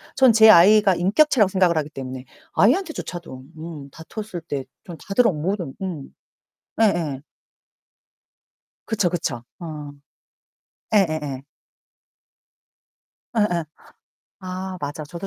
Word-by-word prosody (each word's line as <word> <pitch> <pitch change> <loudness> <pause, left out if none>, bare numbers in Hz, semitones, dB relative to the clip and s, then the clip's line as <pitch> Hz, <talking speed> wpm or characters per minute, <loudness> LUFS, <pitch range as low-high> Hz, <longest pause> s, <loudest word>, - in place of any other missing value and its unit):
전 260 -3 +6
제 220 0 +7
아이가 205 +1 +7
인격체라고 210 - +3
생각을 185 -4 +2
하기 150 -1 -1
때문에 130 -2 -7 0.3
아이한테조차도 205 - 0
음 155 -3 -8
다퉜을 180 +4 -8
때 135 -2 -3 0.2
전 170 -2 -9
다들 220 +4 +3
어 - - +3
모든 170 -1 -3
음. 175 -8 -5 0.7
예예. 165 -10 +1 1.6
그쵸, 210 -5 +1
그쵸. 155 -9 -3 0.2
어. 150 -4 -7 1.0
예예예. 155 -9 +1 2.0
예예. 180 -6 +1 0.8
아 185 0 -6
맞아 145 +1 -5
저도 170 +5 -7
175 Hz, 210 characters per minute, -22 LUFS, 150-205 Hz, 2.0 s, 제